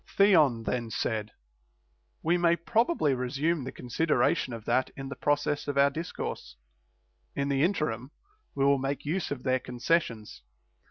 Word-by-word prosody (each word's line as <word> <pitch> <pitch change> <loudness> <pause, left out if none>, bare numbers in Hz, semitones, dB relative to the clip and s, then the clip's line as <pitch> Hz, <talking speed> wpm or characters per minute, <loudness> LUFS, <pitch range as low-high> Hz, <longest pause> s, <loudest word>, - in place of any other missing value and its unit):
3. 200 - +4
Theon 140 - +4
then 120 0 -2
said: 110 -2 -2 0.9
We 170 +2 +3
may 170 -1 +3
probably 220 - +1
resume 135 +5 -1
the 130 - -5
con - - -11
sideration 140 0 +1
of 115 -2 -7
that 130 - +1
in 135 0 -6
the 140 - -6
process 145 0 0
of 145 -1 -2
our 140 0 +5
discourse; 155 - -5 0.8
in 140 0 -1
the 140 -1 +1
interim 140 - 0 0.5
we 135 - +1
will 140 0 +4
make 135 +2 -3
use 160 +3 -1
of 140 -3 -5
their 130 -1 +2
concessions. 120 - -1
140 Hz, 160 wpm, -28 LUFS, 125-160 Hz, 0.9 s, our